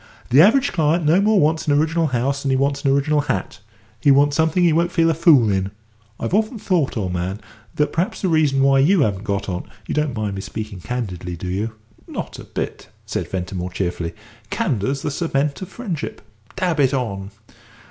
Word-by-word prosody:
The 135 +5 +7
average 265 - +4
client 160 0 +2
no 165 +6 +4
more 210 0 +4
wants 160 0 +1
an 145 - +3
original 160 +2 +1
house 135 +2 -1
than 140 - -2
he 130 - +3
wants 140 +1 0
an 140 - +2
original 145 +2 +2
hat; 95 -10 -3 0.4
he 140 - +2
wants 140 +1 +5
something 160 +3 +2
he 170 -2 +4
won't 170 +2 +2
feel 165 -1 +3
a - - +1
fool 150 - +5
in. 95 0 0 0.5
I've 115 - -3
often 220 +3 +1
thought, 175 - 0
old 95 -4 -2
man, 90 +3 -3 0.4
that 150 - 0
perhaps 190 +7 -2
the - - +2
reason 150 -5 +3
why 135 0 +5
you 170 +6 +4
haven't 105 -4 0
got 100 -3 -2
on 90 -1 -4 0.2
you - - -4
don't 150 -4 0
mind 105 -2 -2
my 95 - -5
speaking 105 0 -6
candidly, 90 -7 -4
do 90 +2 -7
you?" 105 +5 -2 0.3
"Not - - -6
a - - -8
bit," - - -5 0.2
said - - -3
Ventimore, 90 -1 -3
cheerfully. 85 -2 -3 0.3
"Candour's 140 - -1
the - - -1
cement 145 -1 -1
of 190 - -6
friendship. 185 - -5 0.3
Dab 180 -4 0
it 135 -1 +3
on." 100 -6 -3
140 Hz, 200 wpm, -21 LUFS, 105-165 Hz, 0.5 s, The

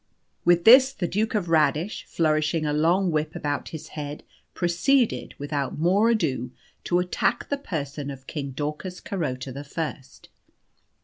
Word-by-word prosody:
With 175 +1 +4
this 260 +4 +8
the 180 -9 -2
Duke 215 +5 -1
of 200 -5 0
Radish, 160 +4 +1
flourishing 155 0 +1
a 150 - 0
long 170 +5 +2
whip 155 +2 -1
about 145 -4 -3
his 160 -1 -8
head, 145 -1 -6 0.3
proceeded, 215 +9 +1
without 145 -1 -3
more 190 +8 +3
ado, 150 - 0 0.4
to 175 - +2
attack 180 0 0
the 285 - 0
person 145 - -4
of 135 -1 -9
King 140 -2 -5
Daucus 150 +7 -5
Carota 135 -8 -4
the 140 +3 -7
First. 140 -3 -6
160 Hz, 145 wpm, -25 LUFS, 145-180 Hz, 0.4 s, this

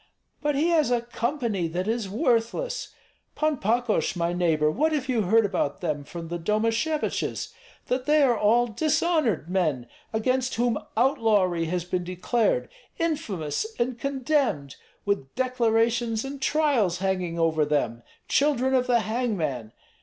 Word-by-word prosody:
But 295 -1 0
he 310 +5 +2
has 315 -6 +3
a 245 -1 +2
company 235 - -2
that 180 +4 -3
is 225 -3 -1
worthless. 255 - -1 0.4
Pan 310 -1 +1
Pakosh, 230 0 0
my 170 0 0
neighbor, 160 -4 +2
what 310 - +1
have 280 -4 -1
you 245 -4 +1
heard 225 +4 +4
about 180 -7 -1
them 150 -4 -2
from 165 +3 -8
the 175 0 -3
Domasheviches? 225 - -1 0.3
That 255 +2 -2
they 300 0 +5
are 250 -3 +4
all 230 +3 +3
dishonored 305 - +1
men, 160 -9 0 0.3
against 255 +3 0
whom 235 -2 +1 0.2
outlawry 210 -9 +2
has 175 +1 -2
been 180 0 -2
declared, 220 - 0 0.3
infamous 210 - -2
and 240 0 -1
condemned, 265 - 0 0.3
with 200 -10 -2
declarations 235 -2 +1
and 275 0 -7
trials 265 - +2
hanging 185 -3 -1
over 160 -2 +2
them, 140 -6 0 0.3
children 270 -2 +2
of 255 -1 +2
the 240 -2 +3
hangman. 190 - -2
225 Hz, 140 wpm, -26 LUFS, 175-260 Hz, 0.4 s, they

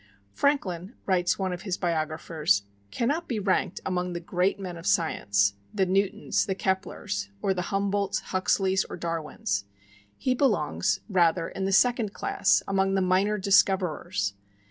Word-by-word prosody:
"Franklin," 195 - 0
writes 180 -2 +2
one 190 -2 -1
of 175 - -6
his 190 -3 -3
biographers, 155 - 0 0.3
"cannot 290 - -1
be 235 - -2
ranked 190 -2 0
among 180 -1 -1
the 170 - -3
great 180 +3 0
men 185 -3 -5
of 165 +2 -7
science, 100 - +2 0.2
the 195 -2 +1
Newtons, 195 +1 0
the 190 - -1
Keplers, 190 - -2
or 190 - +1
the 180 -2 -3
Humboldts, 200 +1 0
Huxleys 190 0 +2
or - - -7
Darwins. 160 - -2 0.5
He 255 - +1
belongs, 205 - +1
rather, 170 -4 +2
in 190 - -4
the 195 - 0
second 230 0 +3
class, - - +2
among 195 0 +1
the 190 - +2
minor 190 +3 +2
discoverers. 185 - +2
185 Hz, 145 wpm, -27 LUFS, 170-195 Hz, 0.5 s, second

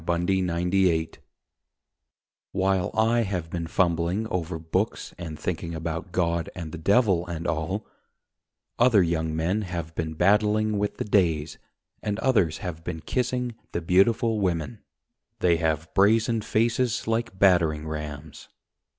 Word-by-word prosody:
THE 85 - -1 0.3
LIFE 90 0 -1
THEORETIC 85 -4 +1 1.3
While 95 -1 +1
I 115 +2 +3
have 90 -6 -3
been 85 -1 -3
fumbling 85 +4 +1
over 85 -1 -2
books 80 0 -2
And 80 -3 -6
thinking 85 0 -4
about 80 +2 -4
God 85 -2 0
and 85 -4 -6
the 85 - -7
Devil 95 -2 +3
and 85 -1 -5
all, 85 +7 -2 0.9
Other 115 -5 +5
young 80 -2 -1
men 90 +7 0
have 85 -4 -5
been 80 -1 -3
battling 105 +3 +2
with 105 0 -2
the - - -3
days 85 -7 +1 0.4
And 105 -1 -2
others 100 -12 +2
have 80 -3 -5
been 80 - -5
kissing 125 +1 -1 0.2
the 85 - -1
beautiful 105 +6 +3
women. 95 +3 -1 0.6
They 85 -2 +3
have 80 -1 -1
brazen 110 +3 +3
faces 115 +2 0
like 115 -3 -1
battering 85 -5 +3
rams. 75 -2 -7
90 Hz, 135 wpm, -26 LUFS, 80-105 Hz, 1.3 s, Other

